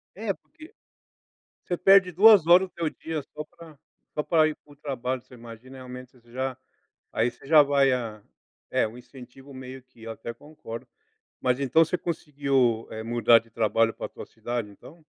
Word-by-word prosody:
É, 205 0 -2
porque 330 - -17 0.9
você 175 - -2
perde 195 -1 +5
2 200 0 +7
horas 180 +2 +6
do - - -41
teu 165 -2 -1
dia 160 -1 -5
só 150 - -5
pra 165 -1 -16 0.4
só 150 - -1
pra 160 -2 +3
ir 155 - -1
para 145 - -20
o - - -21
trabalho, 130 -3 -4
você 125 - -20
imagina 120 +3 -12
realmente 125 0 -10
você 120 -2 -23
já 130 0 -2 0.6
aí 120 +2 +1
você 130 - -17
já 150 -1 +7
vai 140 -1 +3
a 115 -4 -4 0.5
é, - - +2
o 115 - -11
incentivo 130 +2 -14
meio 130 0 -9
que, 125 -3 -20
eu 115 - -6
até 115 +1 -7
concordo, 115 -4 -10 0.5
mas 125 0 +1
então 140 +5 +4
você 180 - -2
conseguiu, 140 -8 0
eh, 110 0 -6
mudar 115 0 +4
de 115 - -24
trabalho 115 0 +1
pra - - -6
tua - - -11
cidade, 120 -3 -5
então? 155 +10 -16
130 Hz, 185 wpm, -26 LUFS, 120-155 Hz, 0.9 s, 2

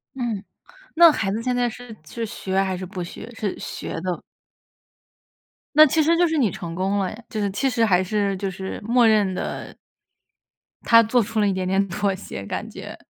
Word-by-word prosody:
嗯， 230 -6 -3 0.5
那 335 -1 +8
孩 205 -8 -1
子 225 +3 -3
现 250 -1 0
在 245 -1 +1
是 240 -1 -10
是 230 +9 -5
学 190 -2 -4
还 190 -2 -1
是 185 - -5
不 180 -1 -6
学？ 200 +6 -9
是 210 -4 -3
学 - - -6
的？ 180 -1 -3 1.5
那 310 0 +9
其 315 +3 +2
实 330 +2 +3
就 350 -1 +3
是 320 - -1
你 235 -9 +2
成 170 -2 -7
功 195 +3 0
了 190 -2 -1
呀， 225 +3 -10
就 215 -3 -3
是 200 -1 0
其 270 +7 0
实 230 -2 +2
还 185 -3 +3
是 200 0 0
就 195 0 -3
是 190 +1 -6
默 240 0 +4
认 205 -4 +3
的 - - -5 1.1
他 230 0 +7
做 230 +2 +2
出 220 +1 -2
了 205 - +3
一 - - +1
点 185 -1 -2
点 195 +1 +2
妥 195 +2 0
协 100 - -8
感 - - -4
觉。 - - -9
210 Hz, 220 characters per minute, -23 LUFS, 190-240 Hz, 1.5 s, 那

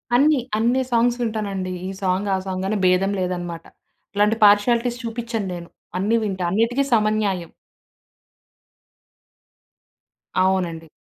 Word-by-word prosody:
అన్నీ, 290 +2 +4 0.2
అన్ని 240 +4 +2
సాంగ్స్ 240 +1 +2
వింటానండి. 200 -5 -2 0.2
ఈ 190 - -4
సాంగ్ 190 +1 0
ఆ - - 0
సాంగని 190 +2 -2
భేదం 185 +2 +3
లేదనమాట. 175 -2 -4 0.5
ఇలాంటి 210 +2 +3
పార్షియాలిటీస్ 235 +4 +3
చూపిచ్చను 230 -2 -3
నేను. 170 -1 -8 0.3
అన్నీ 210 +4 +1
వింటా. 190 -3 -2
అన్నిటికీ 230 +7 +2
సమన్యాయం. 210 -5 +1 2.9
అవునండి. 175 -4 0
205 Hz, 105 wpm, -22 LUFS, 185-230 Hz, 2.9 s, అన్నీ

